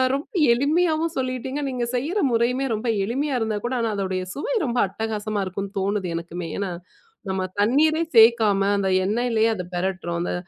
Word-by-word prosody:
ரொம்ப 280 - -5 0.3
எளிமையாவும் 315 +5 +1
சொல்லீட்டீங்க. 260 +1 -2
நீங்க 250 -2 -2
செய்யிற 305 +12 -1
முறையுமே 240 +3 +1
ரொம்ப 215 +3 -4 0.2
எளிமையா 270 +6 -1
இருந்தாகூட 225 +3 -2
ஆனா, 225 -1 0
அதோடைய 190 -1 -2
சுவை - - -2
ரொம்ப 245 -1 -2
அட்டகாசமா 215 +1 -3
இருக்குன்னு 195 +2 -5
தோணுது 200 -1 -1
எனக்குமே! 170 0 -6
ஏன்னா, 200 -2 -2 0.6
நம்ம 190 0 -1 0.2
தண்ணீரே 310 +9 +3
சேர்க்காம, 220 -3 +6 0.2
அந்த 195 -1 0 0.2
எண்ணெயிலேயே 225 +1 +1
அத 180 - -4
பெரட்டுறோம். 175 -2 -2
அந்த - - -2
225 Hz, 150 wpm, -23 LUFS, 195-260 Hz, 0.6 s, சேர்க்காம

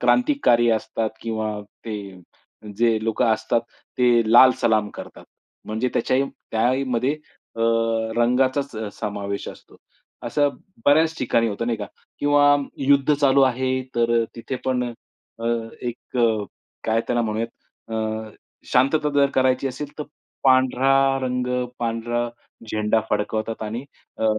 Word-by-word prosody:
क्रांतिकारी 245 - +3
असतात 110 0 -1
किंवा 110 -2 -3 0.2
ते 110 - -4 0.8
जे 115 0 +3
लोकं 115 +2 +1
असतात, 110 +1 0 0.4
ते 120 -1 +5
लाल 130 +2 +9
सलाम 110 -2 +2
करतात. - - -10 0.4
म्हणजे 110 +4 -1
त्याच्याही, 130 +3 +2 0.3
त्याहीमध्ये 125 +3 +1 0.4
अ, - - -5 0.6
रंगाचाच 130 +3 +1
अ, 110 -1 -4
समावेश 100 -2 -4
असतो. - - -13 0.5
असं 145 -1 +1 0.4
बऱ्याच 160 +3 +4
ठिकाणी 115 -2 +1
होतं 110 +3 -3
नाही 115 -2 -1
का? 105 - -4 0.3
किंवा 145 0 +5 0.2
युद्ध 140 +1 +3
चालू 140 -1 +3
आहे 130 0 +1
तर 120 0 +2
अ, - - -1
तिथे 130 +3 -4
पण 125 -1 0
अ, 120 - -4 0.5
अ, - - 0 0.4
एक 120 +1 -6
अ, 110 -3 +2 0.4
काय 115 0 +2
त्याला 120 -1 +1
म्हणूयात? 110 +1 -2 0.4
अ, 110 0 -3 0.4
शांतता 145 +4 +3
जर 140 -1 +4
करायची 130 0 +2
असेल 140 +3 -6
तर, 150 - -3 0.4
पांढरा 130 0 +4 0.3
रंग, 125 -1 -1 0.3
पांढरा 120 +1 -1 0.4
झेंडा 110 +1 +1
फडकवतात 110 +2 -2
आणि 115 +5 -4 0.3
अ, - - -1
120 Hz, 130 wpm, -23 LUFS, 110-130 Hz, 0.8 s, लाल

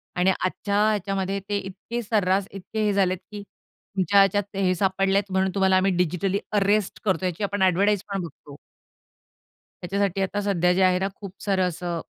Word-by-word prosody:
आणि 180 +2 +3
आजच्या 200 +2 -2
ह्याच्यामध्ये 195 -1 -1
ते 205 - +1
इतके 200 +5 -5
सर्रास 200 -2 +1
इतके 205 +3 -4
हे 205 - +2
झालेत 185 -2 +2
की 205 -1 -6
तुमच्या 200 -1 -2
ह्याच्यात 200 0 +2
हे 185 -2 +2
सापडलेत 195 +1 +1
म्हणून 190 0 +1
तुम्हाला 190 -1 +3
आम्ही 190 +1 +2
डिजिटली 180 +3 0
अरेस्ट 205 0 +1
करतो 185 -2 +1
याची 180 +3 -2
आपण 200 0 -2
एडव्हर्टाइज 195 +2 +3
पण 195 -2 -1
बघतो. 145 -2 -11 1.3
त्याच्यासाठी 195 +1 -1
आता 205 +2 -1
सध्या 180 -3 +2
जे 190 - +1
आहे 185 0 +3
ना 195 - 0
खूप 200 -3 -9
सारं 190 -2 +1
असं, 170 0 -4
195 Hz, 170 wpm, -24 LUFS, 185-200 Hz, 1.3 s, आणि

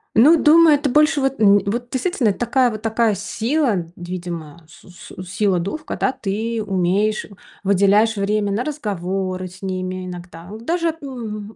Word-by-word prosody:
Ну, 280 +9 +7
думаю, 320 0 +6
это 285 0 -1
больше 300 +2 +3
вот 270 -2 -1
н 205 -1 +6
вот 240 +4 -2
действительно, 260 -2 0
это 195 - -3
такая 245 +1 +2
вот 215 -2 -6
такая 225 -1 +1
с 195 - -7
сила, 230 - 0
видимо, 170 -3 -7
су 165 - -18
су 180 +1 -11
сила 195 +1 0
духа, 250 - -5
когда 260 - -1
ты 220 +1 -3
умеешь, 195 +3 0
э, - - -17 0.3
выделяешь 200 +3 +3
время 205 +1 0
на 220 +6 -1
разговоры 190 - -3
с 185 +2 -15
ними 185 -1 -4
иногда, 175 -1 -9
вот 220 +2 -10
даже, 335 0 0
м, 220 -6 -7
210 Hz, 170 wpm, -20 LUFS, 185-250 Hz, 0.3 s, Ну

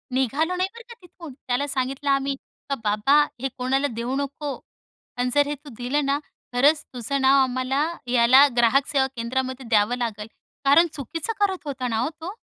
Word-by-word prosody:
निघालो 285 +8 0
नाही 370 +1 0
बरं 470 0 -12
का 470 - -8
तिथून. 340 -5 -12
त्याला 255 +4 0
सांगितलं 275 +1 -2
आम्ही, 275 0 +1 0.3
"का 275 - 0
बाबा, 215 +8 +4 0.2
हे 270 - 0
कोणाला 265 +3 +1
देऊ 235 +2 -4
नको 280 +1 -3 0.6
आणि 250 0 0
जर 290 0 +4
हे 295 - -2
तू 285 +1 -14
दिलं 270 +4 -1
ना, 280 +1 +1 0.3
खरंच 290 +5 +3
तुझं 260 +3 -2
नाव 270 +1 +5
आम्हाला 255 +3 0 0.2
याला 250 +3 +6
ग्राहक 250 +4 +4
सेवा 270 -2 +2
केंद्रामध्ये 255 +2 -3
द्यावं 220 +2 +3
लागल." 220 -3 -4 0.4
कारण 310 +5 +6
चुकीचं 320 - -4
करत 380 -6 0
होता 260 -3 -3
ना 225 -2 -1
हो 255 +6 0
तो? 365 +5 -5
270 Hz, 180 wpm, -24 LUFS, 250-290 Hz, 0.6 s, याला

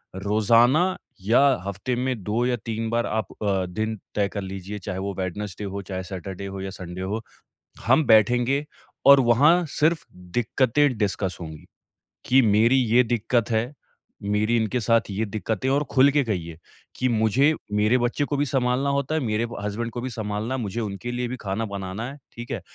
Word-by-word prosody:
रोज़ाना 115 - +3 0.2
या 110 +6 +3 0.3
हफ्ते 100 +6 -3
में 125 -4 -2
2 110 +5 0
या 125 0 +1
3 115 0 -3
बार 115 +1 0
आप 110 -2 -2 0.2
अ, 95 -2 +1
दिन 110 +5 -3 0.2
तय 100 -1 +2
कर 100 - -3
लीजिए। 95 +2 -6
चाहे 90 0 -5
वो 100 +1 -3
वेडनेसडे 95 +2 -4
हो, 100 0 -4
चाहे 95 -1 -5
सैटरडे 95 +1 -7
हो 95 0 -6
या 95 - -4
संडे 90 0 -7
हो, 105 +4 -3 0.6
हम 130 +6 +4
बैठेंगे 120 +6 +4 0.4
और 140 0 +9
वहाँ 150 +9 +5
सिर्फ 160 +2 +2 0.3
दिक्कतें 130 +3 +2
डिस्कस 100 -3 -1
होंगी। 80 -2 -8 0.6
कि 135 +1 +5
मेरी 110 +2 +4
ये 125 -1 +4
दिक्कत 115 0 0
है, 115 +5 0 0.5
मेरी 105 +3 +1
इनके 115 +2 0
साथ 115 0 +3
ये 105 +3 -1
दिक्कतें 110 +2 -3
है - - +2
और 145 - +1
खुल 135 +1 +6
के 145 0 +2
कहिए, 85 -8 -4 0.4
कि 130 - 0
मुझे 120 +6 +3 0.2
मेरे 105 +4 +3
बच्चे 120 +4 0
को 145 - -2
भी 145 - +1
सँभालना 130 0 0
होता 140 +2 -1
है, 160 - 0
मेरे 110 -2 0 0.2
हसबैंड 105 +3 -3
को 120 - -5
भी 130 - -3
सँभालना 110 +2 -3
है, - - -3
मुझे 105 +1 -3
उनके 105 +3 -4
लिए 120 0 -2
भी 125 - -4
खाना 100 +3 -2
बनाना 100 +1 -5
है। 140 - -11 0.2
ठीक 120 0 -8
है? - - -3
110 Hz, 185 wpm, -24 LUFS, 100-125 Hz, 0.6 s, और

